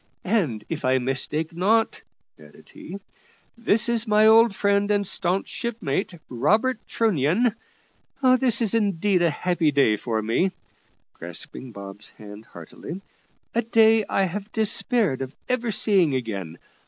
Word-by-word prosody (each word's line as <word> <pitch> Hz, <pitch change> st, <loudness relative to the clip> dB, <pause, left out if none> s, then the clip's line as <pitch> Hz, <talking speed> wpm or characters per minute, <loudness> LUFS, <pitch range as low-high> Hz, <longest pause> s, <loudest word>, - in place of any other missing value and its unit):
And, 160 Hz, -, -1 dB
if -, -, -5 dB
I 130 Hz, +1 st, +2 dB
mistake 135 Hz, +5 st, -2 dB
not," 215 Hz, +6 st, +1 dB, 0.4 s
added 75 Hz, -1 st, -17 dB
he, 185 Hz, -, -9 dB, 0.6 s
"this 230 Hz, -1 st, +2 dB
is 235 Hz, -1 st, 0 dB
my 210 Hz, 0 st, +4 dB
old 225 Hz, -1 st, +6 dB
friend 200 Hz, 0 st, +1 dB
and 205 Hz, -1 st, +1 dB
staunch 185 Hz, +1 st, 0 dB
shipmate, 195 Hz, -7 st, -3 dB
Robert 215 Hz, -, +1 dB
Trunnion. 210 Hz, -, +1 dB, 0.9 s
This 245 Hz, -3 st, +2 dB
is 220 Hz, -, -1 dB
indeed 200 Hz, -4 st, +1 dB
a 170 Hz, -, +3 dB
happy 170 Hz, 0 st, 0 dB
day 135 Hz, -7 st, +3 dB
for 110 Hz, +1 st, -2 dB
me," 175 Hz, -, 0 dB, 0.6 s
grasping 85 Hz, +9 st, -8 dB
Bob's 100 Hz, 0 st, -10 dB
hand 105 Hz, 0 st, -13 dB
heartily, 115 Hz, -, -10 dB, 0.5 s
"a 235 Hz, -, +1 dB
day 225 Hz, -1 st, +4 dB
I 195 Hz, -, +1 dB
have 200 Hz, +3 st, -4 dB
despaired 220 Hz, -, 0 dB
of 135 Hz, +1 st, -6 dB
ever 250 Hz, -2 st, -1 dB
seeing 190 Hz, -8 st, +2 dB
again. 100 Hz, -9 st, -5 dB
185 Hz, 135 wpm, -24 LUFS, 130-220 Hz, 0.9 s, old